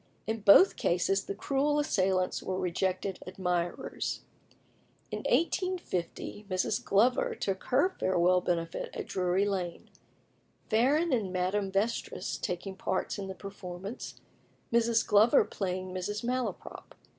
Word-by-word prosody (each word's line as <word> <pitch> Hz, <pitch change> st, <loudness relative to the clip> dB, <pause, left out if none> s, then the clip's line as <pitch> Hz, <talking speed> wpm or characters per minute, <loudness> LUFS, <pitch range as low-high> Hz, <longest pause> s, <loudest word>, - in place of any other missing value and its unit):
In 220 Hz, +1 st, -2 dB
both 205 Hz, -, +7 dB
cases 195 Hz, +3 st, +1 dB
the 200 Hz, -, -4 dB
cruel 280 Hz, +6 st, +1 dB
assailants 190 Hz, -10 st, +1 dB
were 185 Hz, -, -3 dB
rejected 185 Hz, +1 st, -1 dB
admirers. 180 Hz, -2 st, -2 dB, 0.9 s
In -, -, -3 dB
1850 335 Hz, -, -1 dB
Mrs. 185 Hz, -1 st, 0 dB
Glover 235 Hz, +6 st, +2 dB
took 190 Hz, -1 st, -3 dB
her 285 Hz, +9 st, +3 dB
farewell 180 Hz, 0 st, +3 dB
benefit 165 Hz, -2 st, -2 dB
at -, -, -4 dB
Drury 185 Hz, +1 st, +1 dB
Lane; 185 Hz, -4 st, -3 dB, 0.8 s
Farren 280 Hz, +8 st, +3 dB
and 210 Hz, -7 st, 0 dB
Madame 190 Hz, +2 st, 0 dB
Vestris 200 Hz, -1 st, -1 dB
taking 185 Hz, +2 st, -3 dB
parts 190 Hz, +2 st, -2 dB
in 195 Hz, -, -4 dB
the 190 Hz, -, -6 dB
performance 195 Hz, +2 st, -8 dB, 0.5 s
Mrs. 230 Hz, 0 st, +3 dB
Glover 215 Hz, +2 st, +5 dB
playing 185 Hz, -1 st, -4 dB
Mrs. 205 Hz, +4 st, -3 dB
Malaprop. 250 Hz, +1 st, -4 dB
195 Hz, 120 wpm, -30 LUFS, 185-230 Hz, 0.9 s, both